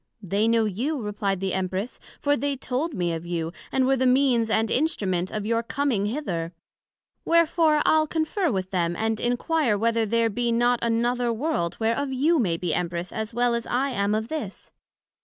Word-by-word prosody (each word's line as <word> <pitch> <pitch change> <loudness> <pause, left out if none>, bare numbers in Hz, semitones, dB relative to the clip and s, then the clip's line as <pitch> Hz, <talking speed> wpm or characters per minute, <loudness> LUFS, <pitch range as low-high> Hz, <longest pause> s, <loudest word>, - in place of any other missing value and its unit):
They 200 +4 +1
know 230 -1 +3
you, 250 - -2
replied 205 -3 -2
the 190 -1 -1
Empress; 190 +4 -3 0.2
for 285 0 +2
they 285 -1 -1
told 270 +4 -3
me 175 -2 -1
of 165 0 -4
you, 170 -1 -3 0.2
and 260 -1 +2
were 270 +1 +3
the 260 0 +1
means 250 -3 +3
and 220 0 +1
instrument 190 - 0
of 210 -1 -4
your 230 +1 +1
coming 235 -4 -1
hither: 180 - -3 0.7
Wherefore 330 -2 +3
I'le 315 0 +4
conferr 325 +2 0
with 190 -3 -3
them, 175 -2 0
and 220 +2 -1
enquire 245 0 +1
whether 230 +1 +1
there 230 +1 +1
be 240 +2 0
not 240 +1 +2
another 235 +1 +1
World, 230 - -1
whereof 230 +5 0
you 300 +6 +2
may 175 -8 +1
be 175 0 -2
Empress 175 0 -2
as 220 0 -4
well 240 +1 +1
as 235 -1 -2
I 265 +3 0
am 205 -3 0
of 220 +1 -2
this? 295 -12 -6
230 Hz, 185 wpm, -25 LUFS, 200-270 Hz, 0.7 s, I'le